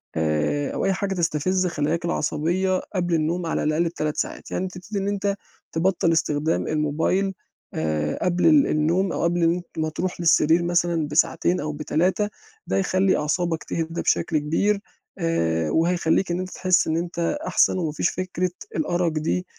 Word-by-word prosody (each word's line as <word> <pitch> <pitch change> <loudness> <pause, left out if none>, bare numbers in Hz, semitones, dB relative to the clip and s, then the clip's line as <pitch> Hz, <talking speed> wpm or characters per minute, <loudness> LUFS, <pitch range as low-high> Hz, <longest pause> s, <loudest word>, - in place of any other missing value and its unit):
آآ، 80 - 0
أو - - -1
أي 195 - +2
حاجة 195 +1 -2
تستفز 180 +1 0
خلاياك 165 0 -1
العصبية 175 +3 0 0.2
قبل 175 -2 0
النوم 165 +3 0
على 165 - -1
الأقل 155 +2 +1
ب3 155 -3 -2
ساعات - - -4
يعني 190 - -1
تبتدي 185 +3 -6
إن 195 - -2
أنت 200 0 0 0.4
تبطّل 170 0 +2
استخدام 155 0 0
الموبيل 160 +6 0 0.4
آآ، 75 -1 -1
قبل 180 0 +1
ال 300 -3 +6
النوم 170 +5 +1
أو - - -2
قبل 170 0 +1
إن 165 +1 +4
أ 180 - -5 0.2
ما 155 - 0
تروح 175 +4 -3
للسرير 165 0 +4
مثلًا 170 -2 +1
بساعتين 170 +4 +2
أو 150 0 -3
ب3 180 +7 0 0.4
ده - - -1
هيخلّي 190 0 +2
أعصابك 165 +2 -1
تهدى 165 0 -3
بشكل 160 - +1
كبير 180 +8 +1 0.4
آآ، 80 - 0
وهيخلّيك 170 +2 +2
إن 175 - -1
أنت 185 0 -4
تحسّ 185 -1 +2
إن 160 +1 +1
أنت 170 +8 -1
أحسن - - +3
وما 160 -4 -1
فيش 160 - 0
فكرة 185 -1 -2 0.2
الأرق 175 - 0
دي 160 +4 -1
170 Hz, 165 wpm, -24 LUFS, 155-185 Hz, 0.4 s, ال